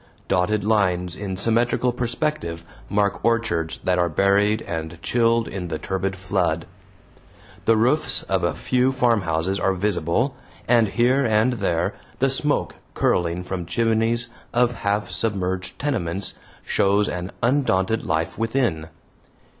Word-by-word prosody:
Dotted 100 +3 +1
lines 90 -5 +1
in 95 -2 -5
symmetrical 115 +4 +2
perspective 120 - -2 0.2
mark 100 -1 0
orchards 95 -9 0
that 90 -1 +1
are 85 0 +2
buried 100 +5 +2
and 80 -2 -5
chilled 115 -1 +2
in 95 -2 -5
the 80 -2 -3
turbid 95 +1 -2
flood. 90 -4 -1 1.0
The 115 0 +4
roofs 130 +8 +2
of 95 -2 -1
a 85 -2 0
few 130 +1 +1
farmhouses 95 -8 +1
are 95 - +2
visible, 105 - 0 0.3
and 115 -2 +4
here 125 +6 +2
and 110 +1 +3
there 90 -7 0 0.2
the - - +2
smoke - - 0 0.2
curling 85 0 +1
from 90 -2 -5
chimneys 115 +4 +1 0.2
of 120 0 +4
half 105 -2 -1
submerged 95 -4 -2
tenements 100 - -2 0.3
shows 100 +1 +2
an 90 +1 -4
undaunted 115 -5 +2
life 80 +4 -2
within. 115 -9 0
100 Hz, 130 wpm, -23 LUFS, 90-115 Hz, 1.0 s, The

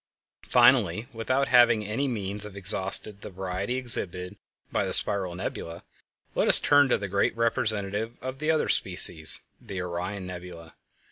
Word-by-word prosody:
Finally, 110 - +2
without 130 +4 -2
having 120 -3 +3
by - - -9
any 115 +7 -3
means 105 -4 -6
exhausted 100 0 0
the - - -10
variety 95 +4 -6
exhibited 100 -7 +2 0.4
by - - -2
the - - 0
spiral 95 -3 +4
nebulæ, 85 -2 -8 0.5
let - - -1
us - - +5
turn 145 -2 +2
to - - +1
the 100 - -7
great 100 +4 -2
representative 110 -1 -2
of 130 +1 -8
the 155 +1 -4
other 160 -1 0
species, 80 0 +3 0.2
the 100 -6 -8
Orion 90 +2 -6
Nebula. 90 -2 -11
100 Hz, 150 wpm, -25 LUFS, 90-120 Hz, 0.5 s, us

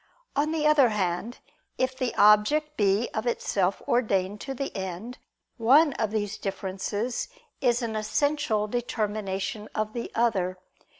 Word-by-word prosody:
On 295 +2 +1
the 315 -2 0
other 300 -5 +6
hand, 205 +3 -2 0.4
if 255 0 0
the 255 -2 -2
object 210 +10 +4
be 205 +2 +2
of 220 +3 -2
itself 195 -5 0
ordained 205 -4 +1
to 270 -1 -5
the 275 +2 -4
end, 190 +6 -5 0.4
one 275 +6 +5
of 220 -5 -1
these 210 0 -2
differences 195 +4 -3 0.3
is 245 -1 +2
an 225 -2 -3
essential 220 -1 0
determination 210 -3 -3
of 215 0 -1
the 235 - -4
other. 195 -6 +1
220 Hz, 135 wpm, -27 LUFS, 205-255 Hz, 0.4 s, other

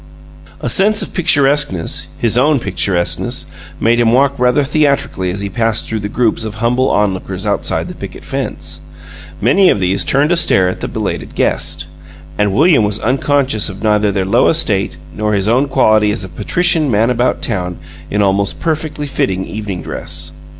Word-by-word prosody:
A - - -3
sense 205 - +3
of - - -8
picturesqueness 145 - +2
his 115 -2 0
own 145 +4 +3
picturesqueness 95 -4 -1 0.3
made 115 +1 +2
him 115 -1 +3
walk 135 +3 +3
rather 125 +3 +2
theatrically 140 -10 0
as 95 +3 -4
he 100 - -3
passed 115 +1 -1
through 110 - -2
the 105 0 -5
groups 115 0 0
of 110 -1 -5
humble 120 +3 +1
onlookers 95 -1 -1
outside 100 -1 -1
the - - -7
picket - - -9
fence. - - -5 0.6
Many 180 - +4
of - - +2
these 95 +1 +1
turned 145 +4 +2
to - - +4
stare 100 - +3
at - - -5
the - - -4
belated - - -4
guest, - - 0 0.5
and 105 +1 +1
William 150 - +4
was 105 0 0
unconscious 130 -2 0
of 95 +2 -9
neither 105 -1 +2
their 95 -1 -1
low 115 +7 +3
estate 105 -12 +1 0.2
nor 105 0 -1
his 100 0 0
own 130 +5 +2
quality 110 -6 +3
as 105 0 -2
a 95 - -7
patrician 160 - +2
man 115 +1 +2
about 125 +1 0
town 90 -6 -2 0.3
in 105 0 +1
almost 100 0 0
perfectly 155 -2 -3
fitting 95 -9 -2
evening 105 -4 -6
dress. 80 0 -5
110 Hz, 175 wpm, -15 LUFS, 100-140 Hz, 0.6 s, Many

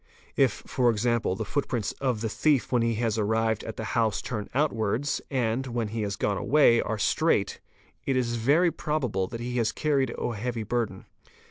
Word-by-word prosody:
If - - +2
for 125 -2 +2
example 115 -3 +1
the 110 - -4
footprints 120 -2 -1
of 125 -5 0
the 115 - 0
thief 140 +4 +1
when 125 -2 +3
he 115 0 +1
has 115 -1 0
arrived 110 +1 +1
at 110 - -7
the 110 - -4
house 110 -4 +1
turn 105 -4 -5
outwards, 130 -1 0
and, 130 -1 0
when 120 -3 -2
he 110 +1 -3
has 100 -2 -2
gone 100 0 0
away, 120 -2 +4
are 110 - -2
straight, 100 - +1 0.5
itis 130 -3 +1
very 145 +10 +3
probable 125 - -1
that 115 - -7
he 125 +1 -3
has 115 -2 +1
carried 140 -5 0
a 120 - -2
heavy 115 +1 -3
burden. 110 -3 -2
115 Hz, 180 wpm, -27 LUFS, 110-130 Hz, 0.5 s, away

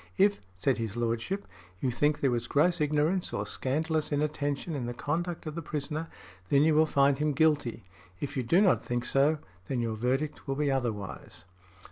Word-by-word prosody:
"If," 200 +1 +4
said 125 +7 +1
his 110 -1 -3
Lordship, 120 - -1 0.3
"you 130 - 0
think 145 +5 +1
there 135 - +3
was 120 -1 -1
gross 170 +3 +2
ignorance 150 +5 +1
or 100 - -1
scandalous 155 +8 -1
inattention 145 +1 -1
in 130 -5 -3
the 120 - -4
conduct 170 +6 -2
of 155 - -4
the 170 - -4
prisoner, 155 +1 -3 0.4
then 140 0 +5
you 160 0 +4
will 155 +1 +5
find 140 -1 +3
him 150 0 +1
guilty; 145 -6 +2 0.4
if 145 0 -4
you 130 - +1
do 165 +11 +3
not 195 -3 +4
think 120 0 -2
so, 140 +5 +3 0.3
then 130 - -1
your 115 -1 -1
verdict 135 +7 -1
will 135 - -1
be 145 0 +1
otherwise". 115 -11 -3
145 Hz, 185 wpm, -29 LUFS, 125-155 Hz, 0.4 s, then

